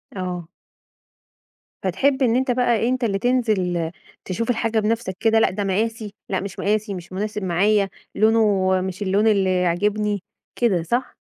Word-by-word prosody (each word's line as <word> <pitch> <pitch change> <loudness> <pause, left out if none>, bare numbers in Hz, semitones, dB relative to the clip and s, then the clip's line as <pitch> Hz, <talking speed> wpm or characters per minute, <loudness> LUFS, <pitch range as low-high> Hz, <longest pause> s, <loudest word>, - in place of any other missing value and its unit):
آه. 180 -3 -4 1.4
فتحب 265 +9 +1
إن 235 -1 +3
أنت 260 0 +1
بقى 240 -1 +2
أنت 255 -1 -1
اللي 200 -3 0
تنزل 195 -9 0 0.3
تشوف 225 +6 -3
الحاجة 230 -1 +1
بنفسك 215 -3 -1
كده، 225 0 +3
لأ، - - +4
ده 205 +2 -3
مقاسي 215 +2 -2 0.2
لأ 190 - 0
مش 195 -1 -7
مقاسي 210 0 0
مش 180 0 -8
مناسب 210 +1 -3
معايا 195 +3 +2 0.3
لونه 215 -3 +3
مش 190 +1 -5
اللون 205 +2 +2
اللي 190 -3 +2
يعجبني، 205 +4 0 0.4
كده 190 -8 +2
صح؟ 240 +9 -2
210 Hz, 150 wpm, -22 LUFS, 185-225 Hz, 1.4 s, لأ